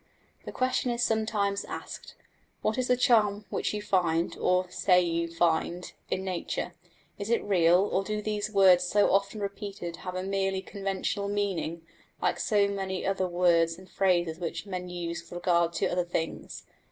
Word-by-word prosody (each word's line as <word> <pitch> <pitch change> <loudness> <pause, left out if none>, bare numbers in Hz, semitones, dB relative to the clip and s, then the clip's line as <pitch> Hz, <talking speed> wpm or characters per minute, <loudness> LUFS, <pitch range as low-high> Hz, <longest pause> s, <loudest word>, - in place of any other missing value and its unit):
The - - -5
question 255 0 0
is 240 0 0
sometimes 215 -3 0
asked, - - -8 0.5
What 215 +4 0
is 250 - 0
the 250 - +3
charm 210 -5 +3
which - - -1
you 210 -1 -4
find, 170 -4 +1
or 180 0 +2
say 180 0 +4
you 170 -1 0
find, 170 +1 0 0.2
in 190 - -1
nature? 185 -2 -3 0.5
Is 200 +1 -4
it 235 - +2
real, 180 -3 +4
or 195 - +1
do 210 +1 -2
these 210 0 -2
words 190 -3 +6
so 205 +3 +3
often 200 +2 +1
repeated 200 -4 -5
have 185 -1 -6
a 185 - -2
merely 195 0 -1
conventional 195 0 -3
meaning, 195 -5 -2 0.4
like 175 -1 0
so 205 -2 +3
many 190 -2 -3
other 190 -1 0
words 170 -2 +2
and 185 0 -14
phrases 175 -4 +1
which 175 +3 -4
men 180 -2 -5
use 170 -1 -4
with 170 - -14
regard 170 -1 +2
to 165 - 0
other 180 0 +1
things? 165 -2 -4
190 Hz, 170 wpm, -28 LUFS, 175-205 Hz, 0.5 s, words